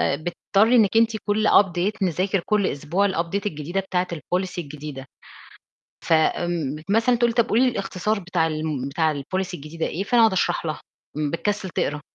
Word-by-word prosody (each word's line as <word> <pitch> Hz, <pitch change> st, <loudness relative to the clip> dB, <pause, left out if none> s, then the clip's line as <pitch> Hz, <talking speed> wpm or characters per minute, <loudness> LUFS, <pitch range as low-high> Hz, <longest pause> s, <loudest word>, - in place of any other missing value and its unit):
بتضطري 195 Hz, -, +1 dB
إنِك 225 Hz, -2 st, +4 dB
أنتِ 225 Hz, -1 st, +3 dB
كل 210 Hz, +1 st, +1 dB
update 185 Hz, 0 st, +3 dB
نذاكر 185 Hz, +2 st, +1 dB
كل 210 Hz, -2 st, +2 dB
أسبوع 155 Hz, +8 st, 0 dB
الupdate 185 Hz, +2 st, -2 dB
الجديدة 165 Hz, 0 st, -3 dB
بتاعِة 185 Hz, -1 st, -1 dB
الpolicy 180 Hz, +4 st, -3 dB
الجديدة. 150 Hz, -4 st, -7 dB, 1.0 s
ف -, -, +5 dB
آمم 160 Hz, -2 st, +1 dB
مثلًا 225 Hz, +4 st, +3 dB
تقول 240 Hz, 0 st, +2 dB
لي: -, -, -9 dB
"طَب 235 Hz, -1 st, +2 dB
قولي 230 Hz, +4 st, +3 dB
لي -, -, +4 dB
الاختصار 200 Hz, +1 st, -2 dB
بتاع 175 Hz, -3 st, 0 dB
الم 155 Hz, -4 st, -3 dB
بتاع 160 Hz, +2 st, +1 dB
الpolicy 185 Hz, +7 st, -3 dB
الجديدة 155 Hz, +2 st, -5 dB
إيه؟" 190 Hz, +5 st, -3 dB
فأنا 235 Hz, +3 st, +3 dB
أقعد 225 Hz, -4 st, +5 dB
أشرح 175 Hz, -2 st, 0 dB
لها، 155 Hz, -2 st, -3 dB, 0.4 s
إمم 150 Hz, -1 st, -1 dB
بتكسل 205 Hz, +3 st, -2 dB
تقرا. 150 Hz, -2 st, -2 dB
180 Hz, 175 wpm, -23 LUFS, 155-205 Hz, 1.0 s, ف